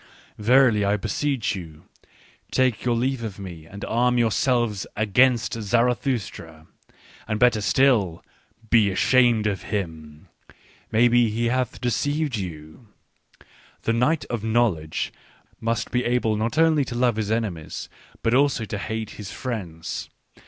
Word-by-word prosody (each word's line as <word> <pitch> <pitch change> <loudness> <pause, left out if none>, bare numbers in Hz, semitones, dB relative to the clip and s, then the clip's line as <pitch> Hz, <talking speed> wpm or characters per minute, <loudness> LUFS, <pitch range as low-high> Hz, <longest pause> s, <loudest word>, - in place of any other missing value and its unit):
" - - -31
Verily, 125 -5 +5
I 100 +1 +2
beseech 110 +3 -1
you: 80 -5 -9 0.7
take 130 -4 +1
your 120 -1 +1
leave 125 +1 -1
of 110 -4 -5
me 85 -5 -9
and 100 +4 -8
arm 125 +2 +1
yourselves 120 -2 +1
against 120 +5 +3
Zarathustra! 115 - -1 0.6
And 110 -1 -2
better 120 -3 +4
still, 105 -8 +2 0.5
be 110 -4 +5
ashamed 120 +2 +3
of 100 -3 -1
him! 80 -6 -5 0.6
Maybe 120 +1 +4
he 115 +2 0
hath 130 -1 -1
deceived 145 +4 -1
you. 85 +2 -7 0.5
" - - -27
The 115 - +1
knight 125 +7 +1
of 115 -3 -4
knowledge 110 -9 0 0.5
must 115 0 -2
be 125 0 +1
able 120 -3 +1
not 115 +7 -2
only 160 -2 +4
to 125 - -6
love 120 -2 +2
his 105 -2 -2
enemies, 105 -9 -3 0.4
but 115 - +2
also 135 -3 +2
to 105 -1 -5
hate 110 0 -4
his 95 -2 -7
friends. 95 -8 -5
115 Hz, 140 wpm, -24 LUFS, 100-125 Hz, 0.7 s, Verily